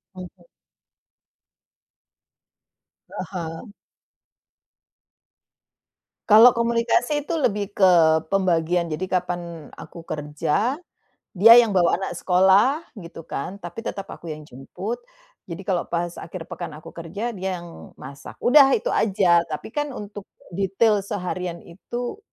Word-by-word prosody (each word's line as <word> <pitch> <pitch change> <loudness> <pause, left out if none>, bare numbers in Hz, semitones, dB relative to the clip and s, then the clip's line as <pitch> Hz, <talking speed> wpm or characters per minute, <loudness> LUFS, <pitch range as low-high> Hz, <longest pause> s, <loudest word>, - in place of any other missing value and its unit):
Mhm. 185 -1 -11 2.7
Ah - - -6
hah. 170 +3 -6 2.6
Kalau 225 +4 +8
komunikasi 235 +5 0
itu 340 - -3
lebih 205 -5 -1
ke 165 -5 +4
pembagian, 175 -3 +1
jadi 185 +5 -3
kapan 180 -1 -1 0.3
aku 165 -1 -12
kerja, 150 - -2 0.6
dia 210 +5 +8
yang 230 -3 +4
bawa 175 -1 +3
anak 190 - -4
sekolah 195 - +3 0.2
gitu 165 -1 -11
kan, 185 +8 -5
tapi 175 +5 -8
tetap 195 -4 -5
aku 165 - -9
yang 155 0 -7
jemput. 180 - -7 0.5
Jadi 170 +3 -7
kalau 185 -3 0
pas 170 0 -2
akhir 170 -1 -8
pekan - - -7
aku 155 - -11
kerja, 200 +8 -5
dia 185 -1 -3
yang 170 -1 -12
masak. 140 +2 -11
Udah 275 +1 +6
itu - - -3
aja, 185 -5 +3
tapi 150 - -5
kan 295 0 -2
untuk 205 -5 -8 0.3
detail 200 +2 +1
seharian 180 -3 -4
itu, 240 - -6
185 Hz, 120 wpm, -23 LUFS, 170-220 Hz, 2.7 s, Kalau